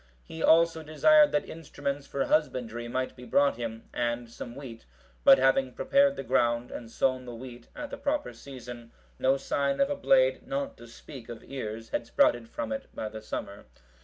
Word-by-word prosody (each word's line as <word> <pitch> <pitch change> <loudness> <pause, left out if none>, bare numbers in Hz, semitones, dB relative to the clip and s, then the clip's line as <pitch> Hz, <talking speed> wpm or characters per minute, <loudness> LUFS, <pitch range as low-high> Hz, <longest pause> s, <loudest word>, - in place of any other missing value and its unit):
He 160 - -9
also 165 0 +4
desired 295 - +5
that 195 - 0
instruments 145 -3 -5
for 140 - -1
husbandry 120 -6 0
might 130 +2 -2
be 125 - -12
brought 140 0 +2
him, 115 -1 -6
and 120 -1 -2
some 120 0 -8
wheat; 125 - -10 0.4
but 135 - +9
having 135 0 +2
prepared 280 - +3
the - - -5
ground 120 -1 +1
and 115 -2 -7
sown 130 +2 0
the 120 -1 -7
wheat 120 0 -10
at 295 -2 -6
the - - -5
proper 290 +1 -2
season, 120 -3 -10 0.3
no 135 +1 +3
sign 140 0 -1
of 275 +1 +2
a - - 0
blade, - - +3
not 280 0 -3
to 120 - -12
speak 120 +1 -12
of 115 -2 -8
ears, 115 -4 -6
had 115 - -2
sprouted 115 0 +2
from 115 -1 -4
it 110 - -4
by 110 - -4
the 110 0 -8
summer. 100 -1 -6
130 Hz, 190 wpm, -28 LUFS, 120-155 Hz, 0.4 s, but